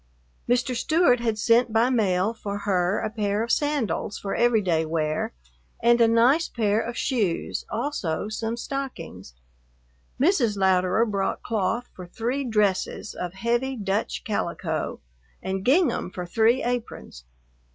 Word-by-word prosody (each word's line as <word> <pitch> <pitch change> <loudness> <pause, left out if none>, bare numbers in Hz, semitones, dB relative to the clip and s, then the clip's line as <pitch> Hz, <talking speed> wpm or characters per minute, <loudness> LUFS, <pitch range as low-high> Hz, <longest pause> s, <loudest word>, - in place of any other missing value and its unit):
Mr. 250 +1 +1
Stewart 310 -1 +3
had 225 -2 -1
sent 230 +2 +3
by 230 +3 +3
mail 205 -3 +1
for 205 -3 -5
her 185 0 +1
a - - -2
pair 210 -1 -1
of 230 - -2
sandals 280 - 0
for 195 - -4
everyday 210 -9 +2
wear 155 -1 -1 0.5
and 235 +1 +4
a 230 - +6
nice 245 +8 +3
pair 215 -2 +1
of 235 +1 -5
shoes, 210 -10 -1
also 215 - -2
some 225 +2 -3
stockings. 235 - -6 0.8
Mrs. 260 - +2
Louderer 190 +2 +3
brought 200 -3 -2
cloth 230 +2 -1
for 180 -1 -10
three 245 +9 -2
dresses 210 -3 0
of 180 -1 -5
heavy 240 +6 -1
Dutch 200 -2 -2
calico, 170 -6 -3 0.4
and 190 0 -3
gingham 265 - +2
for 180 0 -6
three 225 +7 +2
aprons. 235 - -4
220 Hz, 135 wpm, -25 LUFS, 190-240 Hz, 0.8 s, a